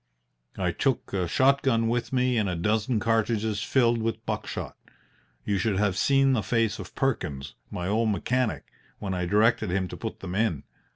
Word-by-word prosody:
I 90 -2 0
took 130 - -1
a 90 -3 0
shot 135 +8 +3
gun 115 -4 +2
with 120 +1 -1
me 125 -1 +2
and 100 -3 0
a 90 - -2
dozen 110 +6 0
cartridges 110 -1 0
filled 120 -1 +2
with 115 0 -3
buck - - -3
shot. - - -5 0.7
You 100 -2 0
should 100 0 0
have 100 -2 +1
seen 135 +5 +3
the 120 - +1
face 115 -1 0
of 95 -2 -9
Perkins, 75 - -2 0.2
my 90 0 -4
old 110 +3 +1
mechanic, 125 +3 -1 0.3
when 95 -2 -4
I 90 -1 -2
directed 110 +2 +3
him 95 +1 0
to - - -7
put - - -6
them 90 -2 -5
in. 95 -8 0
110 Hz, 185 wpm, -26 LUFS, 95-120 Hz, 0.7 s, shot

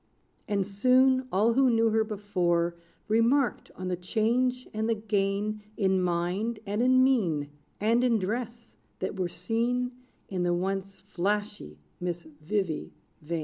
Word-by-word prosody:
And 200 -2 0
soon, 255 +6 +3
all 215 +5 +3
who 265 +1 +4
knew 225 -1 +3
her 220 0 +3
before 180 -5 0 0.3
Remarked 230 +4 +2
on 185 - -5
the 180 - 0
change 240 +7 0
and 220 +1 -1
the 230 - +2
gain 210 0 -1 0.2
In 190 -2 +2
mind, 180 +6 -1
and 205 +2 -1
in 255 +1 +5
mien, 170 - +1 0.3
And 230 +4 +3
in 240 -3 +3
dress, 230 +3 -4 0.2
that 195 - -4
were 180 -1 0
seen 235 +8 -1 0.4
In 185 -2 -3
the 175 0 +2
once 195 +2 -3
flashy 200 - -3 0.2
Miss 175 -1 -3
Vivy 160 +3 -3 0.3
Vain. 165 +2 -3
205 Hz, 145 wpm, -28 LUFS, 180-230 Hz, 0.4 s, in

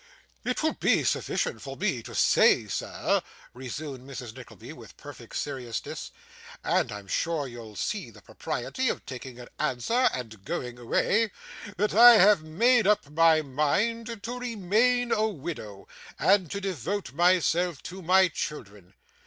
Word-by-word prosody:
'It 250 +4 -2
will 315 - +2
be - - +2
sufficient - - -1
for 135 -1 -8
me 185 - -1
to - - -10
say, - - +4
sir,' - - -1 0.3
resumed 130 +1 -7
Mrs. 125 -4 -8
Nickleby, 115 -6 -11
with - - -14
perfect - - -11
seriousness 130 -6 -5 0.5
'and - - +1
I'm 105 -1 -7
sure 160 - -1
you'll 115 -3 -10
see 200 - -3
the - - -17
propriety 260 -2 -3
of - - -4
taking 130 -1 -8
an 120 - -10
answer 230 - +1
and 110 -5 -7
going 125 +4 -5
away 210 - +1 0.5
that 210 +1 0
I 240 +3 +10
have 205 -3 +6
made 225 +9 +3
up 205 -9 +2
my 160 0 +4
mind 205 - -1
to 245 +2 -5
remain 240 +2 +1
a 215 +1 +2
widow, 140 - -7 0.3
and 190 -4 +3
to 200 - -4
devote 190 - -4
myself 175 -1 +2
to 190 +2 -8
my 185 +2 +5
children. 105 - -7
165 Hz, 145 wpm, -27 LUFS, 125-210 Hz, 0.5 s, I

